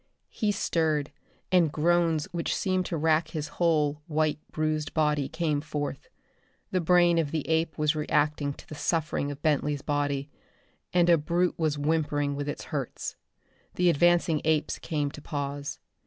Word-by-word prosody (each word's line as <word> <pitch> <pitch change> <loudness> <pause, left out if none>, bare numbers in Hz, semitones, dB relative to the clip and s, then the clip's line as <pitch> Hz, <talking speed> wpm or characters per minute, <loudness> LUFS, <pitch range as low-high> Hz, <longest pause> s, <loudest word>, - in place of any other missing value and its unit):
He 210 -1 0
stirred, 160 -6 0 0.4
and 175 -5 +4
groans 165 0 +2
which 170 -2 -1
seemed 185 -2 0
to 165 - -2
rack 160 +1 +2
his 155 -2 -4
whole 150 -4 +2
white 155 -1 +1
bruised 155 -1 -2
body 150 -3 +1
came 160 -3 -1
forth. 145 -2 -4 0.6
The 185 - +1
brain 175 0 +4
of 155 -3 0
the 155 -1 -3
ape 160 0 0
was 150 0 +2
reacting 150 -1 +1
to - - -15
the - - -8
suffering 155 -1 -1
of 145 0 -8
Bentley's 150 -2 +1
body 145 -1 -1 0.6
and 175 -1 +3
a 170 -2 +5
brute 175 +4 +1
was 155 -2 +1
whimpering 145 -1 0
with 145 0 -3
its - - -5
hurts. 140 -5 -4 0.6
The 180 -1 +4
advancing 170 0 +3
apes 155 -1 +1
came 145 -3 -2
to 150 - -10
pause. 145 -1 -4
155 Hz, 155 wpm, -28 LUFS, 145-165 Hz, 0.6 s, a